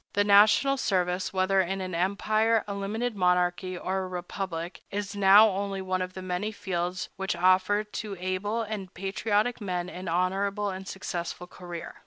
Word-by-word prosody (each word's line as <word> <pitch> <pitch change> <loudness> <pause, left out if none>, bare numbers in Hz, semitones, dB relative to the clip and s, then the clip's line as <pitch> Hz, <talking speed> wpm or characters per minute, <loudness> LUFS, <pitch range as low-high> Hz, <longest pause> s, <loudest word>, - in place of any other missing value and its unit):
The 205 - +3
national 215 +7 +5
service, 180 -5 0
whether 190 0 +2
in 190 +2 -2
an 185 -1 -4
empire, 215 +5 +1
a 200 - -3
limited 215 +4 -2
monarchy, 180 0 +1
or 190 +2 -2
a 190 - -3
republic, 180 -1 -5
is 205 0 -4
now 200 +2 +7
only 195 0 -3
one 185 -1 -2
of 185 0 -4
many 185 +3 -3
fields 180 -3 -3
which 195 +1 -2
offer 185 +3 +3
to 210 -1 -6
able 190 +5 -1
and 205 -4 -5
patriotic 210 +5 0
men 180 -2 -3
an 185 +1 -7
honorable 195 +4 0
and 190 +1 -7
successful 180 -2 -5
career. 175 -1 -9
190 Hz, 160 wpm, -27 LUFS, 180-205 Hz, -, now